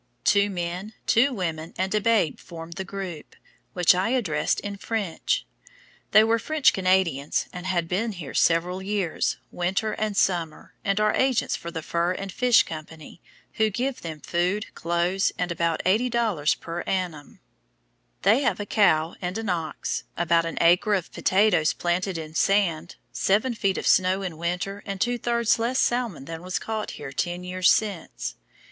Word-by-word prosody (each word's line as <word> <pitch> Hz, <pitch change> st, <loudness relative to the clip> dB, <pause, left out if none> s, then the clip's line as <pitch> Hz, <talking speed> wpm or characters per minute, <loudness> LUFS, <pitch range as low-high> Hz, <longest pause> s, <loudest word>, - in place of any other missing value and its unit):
Two 200 Hz, 0 st, +4 dB
men, 180 Hz, +3 st, -4 dB
two 255 Hz, +5 st, +4 dB
women, 165 Hz, -7 st, -4 dB
and 190 Hz, +1 st, -1 dB
a 210 Hz, -, +2 dB
babe 210 Hz, -9 st, +2 dB
formed 165 Hz, -1 st, -9 dB
the 190 Hz, -, -4 dB
group, 185 Hz, -4 st, -7 dB, 0.4 s
which 180 Hz, -2 st, +5 dB
I 185 Hz, +4 st, 0 dB
addressed 185 Hz, -13 st, 0 dB
in 205 Hz, -1 st, -5 dB
French. 220 Hz, -, -2 dB, 0.6 s
They 215 Hz, -, +7 dB
were 225 Hz, +1 st, +2 dB
French 310 Hz, +2 st, +3 dB
Canadians 185 Hz, -7 st, +1 dB
and 180 Hz, 0 st, -6 dB
had 175 Hz, -3 st, 0 dB
been 210 Hz, +6 st, -1 dB
here 160 Hz, -8 st, -8 dB
several 175 Hz, +3 st, +2 dB
years, 195 Hz, -3 st, -1 dB
winter 190 Hz, +5 st, -1 dB
and 215 Hz, -2 st, -2 dB
summer, 170 Hz, -4 st, 0 dB
and 200 Hz, 0 st, +1 dB
are 215 Hz, 0 st, +3 dB
agents 260 Hz, -2 st, +1 dB
for 170 Hz, -, -6 dB
the 165 Hz, -2 st, -5 dB
Fur 170 Hz, +3 st, 0 dB
and 195 Hz, +1 st, -6 dB
Fish 250 Hz, +3 st, +4 dB
Co., 155 Hz, -1 st, -6 dB, 0.7 s
who 220 Hz, -1 st, +2 dB
give 255 Hz, +5 st, -2 dB
them 160 Hz, -3 st, -7 dB
food, 180 Hz, +5 st, -1 dB
clothes, 175 Hz, +3 st, 0 dB
and 180 Hz, -1 st, -1 dB
about 170 Hz, -1 st, 0 dB
$80 215 Hz, -6 st, +1 dB
per 170 Hz, +1 st, -5 dB
annum. 175 Hz, -6 st, -3 dB, 0.8 s
They 220 Hz, +8 st, +5 dB
have 270 Hz, -, 0 dB
a 205 Hz, -, -3 dB
cow 165 Hz, -7 st, +3 dB
and 180 Hz, +2 st, -3 dB
an 225 Hz, -2 st, -3 dB
ox, 165 Hz, -3 st, -2 dB
about 170 Hz, -1 st, +2 dB
an 165 Hz, -, -5 dB
acre 175 Hz, +5 st, +4 dB
of 185 Hz, -4 st, -3 dB
potatoes 185 Hz, -5 st, +3 dB
planted 180 Hz, +1 st, -1 dB
in 155 Hz, -1 st, -7 dB
sand, 175 Hz, -3 st, +1 dB, 0.2 s
seven 215 Hz, +6 st, +1 dB
feet 195 Hz, -4 st, 0 dB
of -, -, -4 dB
snow 185 Hz, +1 st, +3 dB
in 170 Hz, -4 st, -5 dB
winter, 180 Hz, +4 st, -3 dB
and 195 Hz, -1 st, -5 dB
two 245 Hz, +3 st, 0 dB
thirds 235 Hz, -1 st, +1 dB
less 240 Hz, +3 st, 0 dB
salmon 240 Hz, -, 0 dB
than 165 Hz, +1 st, -7 dB
was 185 Hz, 0 st, -3 dB
caught 220 Hz, -1 st, -4 dB
here 140 Hz, -2 st, -7 dB
ten 175 Hz, +6 st, -2 dB
years 185 Hz, 0 st, +3 dB
since. 200 Hz, -6 st, -2 dB
185 Hz, 165 wpm, -25 LUFS, 170-215 Hz, 0.8 s, They